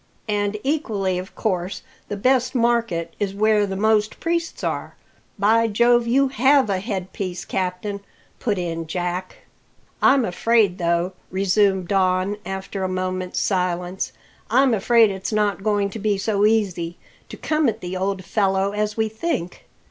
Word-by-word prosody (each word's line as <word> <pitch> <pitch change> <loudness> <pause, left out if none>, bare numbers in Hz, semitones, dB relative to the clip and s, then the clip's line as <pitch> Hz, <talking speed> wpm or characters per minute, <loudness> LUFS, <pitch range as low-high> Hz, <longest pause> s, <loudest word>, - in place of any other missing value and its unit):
"And 205 0 0
equally 210 - -1
of 185 - -9
course 185 -2 -2 0.2
the 205 - -4
best 255 +3 +2
market 230 -9 +1
is 200 -1 -2
where 210 0 +3
the 190 - -4
most 215 +1 +1
priests 335 0 -2
are. - - -3 0.4
By 225 +3 +3
Jove, 235 +2 +3
you 270 +3 +3
have 270 -2 +3
a 190 - 0
headpiece, 185 -3 -4
captain!" 190 +2 -3 0.4
put 210 -4 -1
in 165 -2 -3
Jack. 180 +2 -4 0.6
"I'm 270 -3 +5
afraid, 205 0 +2
though," 170 +2 0 0.2
resumed 190 -1 +2
Don, 190 +1 +1
after 190 0 -4
a 185 - -1
moment's 185 0 -2
silence, 180 -1 -1 0.4
"I'm 255 +2 +4
afraid 225 +1 +4
it's 190 +2 -4
not 210 -3 +1
going 205 -1 0
to 220 - -6
be 210 -1 +1
so 205 +1 +2
easy 180 -6 0 0.3
to - - -8
come 305 -4 +1
at 220 0 -5
the 180 +1 -5
old 190 0 -2
fellow 195 -1 +1
as 210 +1 -2
we 220 0 +2
think. 220 - -4
200 Hz, 150 wpm, -22 LUFS, 185-225 Hz, 0.6 s, I'm